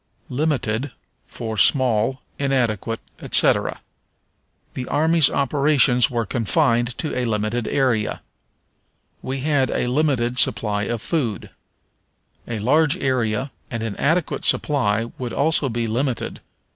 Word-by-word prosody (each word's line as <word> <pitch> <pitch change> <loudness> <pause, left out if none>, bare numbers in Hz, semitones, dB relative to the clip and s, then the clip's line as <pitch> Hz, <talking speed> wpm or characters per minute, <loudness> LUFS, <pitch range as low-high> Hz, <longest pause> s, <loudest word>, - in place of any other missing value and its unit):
Limited 130 -3 -1 0.3
for 110 -2 -6
Small, 125 +1 +3 0.2
Inadequate, 120 -5 0 0.2
etc. - - +1 0.9
"The 125 - -5
army's 160 0 +3
operations 140 -3 +3
were 120 -3 -1
confined 120 +1 +1
to 155 - -3
a 125 - -1
limited 110 +1 -1
area." 125 -6 0 1.0
"We 130 0 -4
had 145 -2 +1
a - - -1
limited 125 -3 +1
supply 105 -2 +1
of 115 0 -3
food." 125 - -2 1.0
A 120 - -3
large 150 - +2
area 130 - -1 0.2
and 115 -2 -4
an 110 -3 -3
adequate 160 +3 0
supply 115 -6 +1
would 125 -2 -4
also 150 -1 +2
be 115 0 -2
limited. 125 +3 -2
125 Hz, 115 wpm, -22 LUFS, 115-140 Hz, 1.0 s, Small